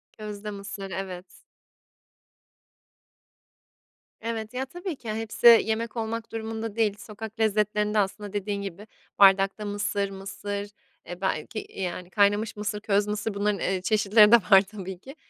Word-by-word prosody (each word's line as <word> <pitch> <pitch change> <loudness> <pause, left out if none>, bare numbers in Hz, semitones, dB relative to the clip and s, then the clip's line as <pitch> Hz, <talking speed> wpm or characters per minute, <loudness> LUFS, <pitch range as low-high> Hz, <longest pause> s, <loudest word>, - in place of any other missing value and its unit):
Közde 210 -1 -7
mısır, 200 -1 -7
evet. 185 -1 -5 3.0
Evet, 225 -1 -4
ya, 260 +1 -2
tabii 350 +3 -6
ki, 225 -4 -6
hepsi 225 +2 +1 0.2
yemek 225 +1 -2
olmak 225 0 -3
durumunda 225 -1 -4
değil, 215 -3 +1
sokak 220 +2 -9
lezzetlerinde, 210 0 +1
aslında, 205 +1 -2
dediğin 200 0 -2
gibi 200 +2 -7 0.3
bardakta 195 +1 +5
mısır, 205 -1 -1
mısır, 200 +1 -5 0.4
eee, 175 +2 -8
belki, 190 +3 -2
yani, 180 -1 -4
kaynamış 205 +2 +2
mısır, 210 0 -3
köz 205 -1 +1
mısır 210 0 -2
bunların, 205 0 0
eee, 185 -1 -1
çeşitleri 210 +1 +5
de 235 - +11
var, 195 -3 +6
tabii 190 -2 -8
ki, 270 +7 -12
210 Hz, 135 wpm, -26 LUFS, 195-220 Hz, 3.0 s, de